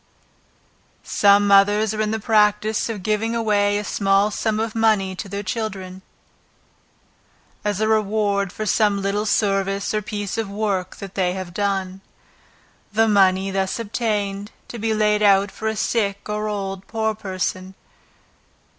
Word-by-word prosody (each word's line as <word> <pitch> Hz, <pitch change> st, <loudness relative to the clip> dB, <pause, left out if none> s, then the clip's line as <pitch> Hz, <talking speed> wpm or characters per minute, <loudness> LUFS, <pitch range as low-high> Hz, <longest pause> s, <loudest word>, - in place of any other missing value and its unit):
Some 205 Hz, 0 st, +4 dB
mothers 205 Hz, +2 st, +4 dB
are 215 Hz, -, -2 dB
in 215 Hz, -, 0 dB
the 220 Hz, +1 st, -1 dB
practice 210 Hz, 0 st, +2 dB
of 210 Hz, -5 st, -5 dB
giving 215 Hz, +2 st, 0 dB
a 205 Hz, -2 st, +1 dB
small 200 Hz, 0 st, +2 dB
sum 215 Hz, 0 st, -1 dB
of 220 Hz, 0 st, -2 dB
money 215 Hz, -4 st, +2 dB
to 195 Hz, +2 st, -7 dB
their 200 Hz, +1 st, -4 dB
children, 190 Hz, -2 st, -5 dB, 1.6 s
as 205 Hz, -2 st, -1 dB
a 215 Hz, -, +1 dB
reward 205 Hz, -2 st, +1 dB
for 215 Hz, -, -5 dB
some 205 Hz, -1 st, +2 dB
little 200 Hz, +2 st, -1 dB
service 195 Hz, -1 st, 0 dB
or 215 Hz, -, 0 dB
piece 205 Hz, 0 st, -4 dB
of 220 Hz, -3 st, -3 dB
work 200 Hz, -3 st, -2 dB
that 195 Hz, -2 st, -9 dB
they 180 Hz, -2 st, 0 dB
have 185 Hz, -2 st, -6 dB
done. 195 Hz, -1 st, -2 dB, 0.9 s
The 225 Hz, +2 st, +3 dB
money 195 Hz, -2 st, +3 dB
thus 190 Hz, -1 st, -1 dB
obtained, 205 Hz, -3 st, -2 dB, 0.2 s
to 235 Hz, -, -7 dB
be 225 Hz, +1 st, -1 dB
laid 210 Hz, 0 st, +2 dB
out 200 Hz, -1 st, +4 dB
for 220 Hz, -, -5 dB
a 220 Hz, -, -1 dB
sick 205 Hz, -2 st, -1 dB
or 210 Hz, 0 st, -2 dB
old 195 Hz, -2 st, -4 dB
poor 220 Hz, -1 st, -1 dB
person. 185 Hz, -2 st, -4 dB
205 Hz, 145 wpm, -22 LUFS, 195-215 Hz, 1.6 s, Some